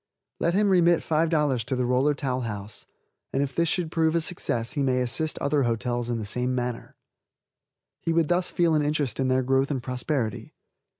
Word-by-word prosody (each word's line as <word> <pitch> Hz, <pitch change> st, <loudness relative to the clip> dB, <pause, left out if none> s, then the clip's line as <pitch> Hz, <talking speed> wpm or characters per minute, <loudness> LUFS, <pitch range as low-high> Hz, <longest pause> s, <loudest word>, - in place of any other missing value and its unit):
Let 170 Hz, +1 st, +1 dB
him 205 Hz, 0 st, +3 dB
remit 175 Hz, -2 st, +4 dB
$5 155 Hz, -6 st, +1 dB
to 130 Hz, +4 st, -2 dB
the 125 Hz, 0 st, 0 dB
Roller 130 Hz, +4 st, +2 dB
Towel 130 Hz, -2 st, -2 dB
House, 105 Hz, -3 st, -6 dB, 0.4 s
and 135 Hz, -, +1 dB
if 140 Hz, -1 st, -4 dB
this 170 Hz, +2 st, +1 dB
should 170 Hz, -4 st, -1 dB
prove 160 Hz, -1 st, +2 dB
a 170 Hz, -, +2 dB
success 120 Hz, -9 st, -2 dB
he 145 Hz, -, -1 dB
may 130 Hz, -2 st, +2 dB
assist 125 Hz, +6 st, -2 dB
other 140 Hz, +1 st, +1 dB
hotels 120 Hz, 0 st, -1 dB
in 120 Hz, -, -1 dB
the 110 Hz, -, -4 dB
same 125 Hz, +4 st, -1 dB
manner. 125 Hz, -1 st, -4 dB, 1.1 s
He 165 Hz, -, -1 dB
would 165 Hz, -1 st, +2 dB
thus 175 Hz, +2 st, +1 dB
feel 170 Hz, -2 st, +2 dB
an 155 Hz, -, +3 dB
interest 145 Hz, -5 st, -1 dB
in 130 Hz, -, +1 dB
their 130 Hz, 0 st, +2 dB
growth 135 Hz, +1 st, +2 dB
and 135 Hz, -4 st, -2 dB
prosperity. 125 Hz, -2 st, -3 dB
135 Hz, 195 wpm, -26 LUFS, 125-160 Hz, 1.1 s, remit